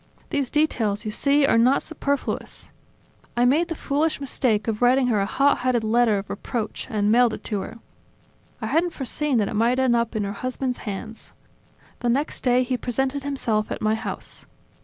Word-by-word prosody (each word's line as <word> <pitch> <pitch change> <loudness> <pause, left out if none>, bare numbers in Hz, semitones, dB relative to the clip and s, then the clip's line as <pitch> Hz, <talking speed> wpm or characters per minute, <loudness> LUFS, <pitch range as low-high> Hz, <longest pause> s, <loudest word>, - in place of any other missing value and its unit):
These 275 -3 0
details, 225 -10 0
you 215 - -2
see, 280 +6 +3
are 230 - +4
not 255 +4 +4
superfluous... 285 -3 -3 0.7
I 240 - +4
made 305 +7 +3
the 330 - -4
foolish 300 +2 0
mistake 245 -6 0
of 220 0 -2
writing 255 +2 +4
her 215 -3 +2
a 195 - 0
hot 280 +5 +2
headed 245 -3 +1
letter 225 -1 +3
of 195 0 -5
reproach, 215 +1 -4
and 210 -3 +1
mailed 240 0 +4
it - - -13
to 210 -3 -2
her. 230 - -7 0.8
I - - -4
hadn't 340 +1 +1
foreseen 275 0 -1
that 210 -3 +2
it - - -4
might 230 +4 +2
end 260 -2 +3
up 235 0 0
in 215 - 0
her 200 0 -3
husband's 255 +3 -3
hands. 220 +3 -7 0.7
The 240 - -1
next 275 +5 0
day 250 0 +3
he 255 0 -1
presented 265 +3 -2
himself 235 -7 -1
at - - -3
my 215 0 +1
house. 220 - -4
245 Hz, 190 wpm, -24 LUFS, 220-275 Hz, 0.8 s, are